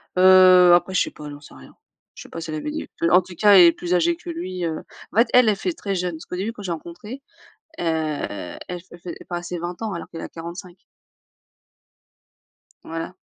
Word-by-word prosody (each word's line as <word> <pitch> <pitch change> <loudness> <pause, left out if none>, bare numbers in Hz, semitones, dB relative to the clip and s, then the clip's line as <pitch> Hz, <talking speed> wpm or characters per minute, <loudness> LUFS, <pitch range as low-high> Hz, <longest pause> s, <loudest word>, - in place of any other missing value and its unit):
Heu, 185 -1 +7
après 175 +2 +3
je - - +3
sais - - -1
pas, 150 -1 -10
j'en 145 0 -10
sais - - -15
rien. 65 -1 -15 0.4
Je - - -10
sais - - -15
pas 165 - -7
si 160 - -7
elle 155 - -3
avait 225 - -4
des 310 - -4 0.2
vues. 170 - +3
En-tout-cas, 185 +3 +4
elle 190 - +9
est 170 - +7
plus 175 +1 -4
âgée 340 - +2
que 355 +1 -11
lui, 185 - -5
heu 160 -1 -3 0.3
en - - -6
fait, 230 - +5
elle, 250 -3 +6
elle 210 - +2
fait 350 - -3
très 205 -12 -4
jeune 180 -1 -2
parce 160 - -9
qu'au - - -6
début, 195 +5 -2
quand 210 -3 -11
je 185 - -3
l'ai - - +1
rencontré, 175 - -9 0.6
heu, - - -3 0.8
elle 180 -1 -5
fait 175 - -15
fait 175 0 -7
passer 175 0 -5
20 175 +4 -6
ans 215 -3 -3
alors 170 - -6
qu'elle 165 - -8
a - - -7
45. 170 +2 -9 2.1
Voilà. 165 +2 -6
180 Hz, 225 wpm, -22 LUFS, 170-200 Hz, 2.1 s, elle